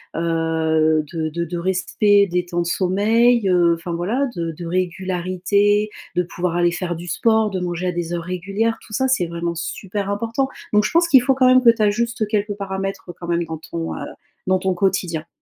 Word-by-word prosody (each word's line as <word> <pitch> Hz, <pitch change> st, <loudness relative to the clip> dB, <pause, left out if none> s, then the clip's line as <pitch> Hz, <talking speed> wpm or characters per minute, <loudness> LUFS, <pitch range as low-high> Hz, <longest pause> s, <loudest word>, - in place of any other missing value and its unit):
heu -, -, -1 dB
heu, 160 Hz, -1 st, +1 dB
de 160 Hz, -2 st, -2 dB
de 170 Hz, +2 st, -3 dB
de 170 Hz, +1 st, -5 dB
respect 190 Hz, +3 st, +2 dB
des 180 Hz, 0 st, 0 dB
temps 175 Hz, 0 st, -2 dB
de -, -, -2 dB
sommeil, 205 Hz, +5 st, +2 dB
heu, 175 Hz, -2 st, +4 dB
enfin 170 Hz, +1 st, -7 dB
voilà, 210 Hz, +12 st, -1 dB
de 165 Hz, -1 st, -2 dB
de 175 Hz, -, -6 dB
régularité, 185 Hz, +3 st, 0 dB, 0.3 s
de 180 Hz, -, +2 dB
pouvoir 175 Hz, 0 st, -3 dB
aller 175 Hz, 0 st, +3 dB
faire 175 Hz, 0 st, -3 dB
du 170 Hz, +2 st, -8 dB
sport, 220 Hz, +1 st, +2 dB
de 190 Hz, -2 st, -3 dB
manger 175 Hz, 0 st, -3 dB
à -, -, +1 dB
des 175 Hz, -1 st, -4 dB
heures 170 Hz, -1 st, -3 dB
régulières, 195 Hz, +6 st, -2 dB
tout 215 Hz, -, -13 dB
ça 265 Hz, +3 st, +1 dB
c'est 250 Hz, -9 st, +2 dB
vraiment 170 Hz, 0 st, -3 dB
super 195 Hz, +4 st, -4 dB
important. 230 Hz, +6 st, -1 dB, 0.2 s
Donc 210 Hz, 0 st, +3 dB
je -, -, -1 dB
pense 335 Hz, 0 st, +3 dB
qu'il 265 Hz, -5 st, +7 dB
faut 270 Hz, +2 st, +2 dB
quand 260 Hz, -1 st, +4 dB
même 255 Hz, 0 st, +6 dB
que 240 Hz, -, +6 dB
tu 230 Hz, -1 st, +3 dB
ajustes 220 Hz, +2 st, +1 dB
quelques 210 Hz, -1 st, 0 dB
paramètres, 195 Hz, -2 st, -5 dB
quand 170 Hz, -, -7 dB
même, 170 Hz, 0 st, 0 dB
dans 160 Hz, -1 st, -6 dB
ton, 165 Hz, +1 st, -5 dB
heu, -, -, -6 dB, 0.5 s
dans 185 Hz, 0 st, +3 dB
ton 190 Hz, 0 st, 0 dB
quotidien. 175 Hz, -3 st, -1 dB
185 Hz, 210 wpm, -21 LUFS, 170-210 Hz, 0.5 s, qu'il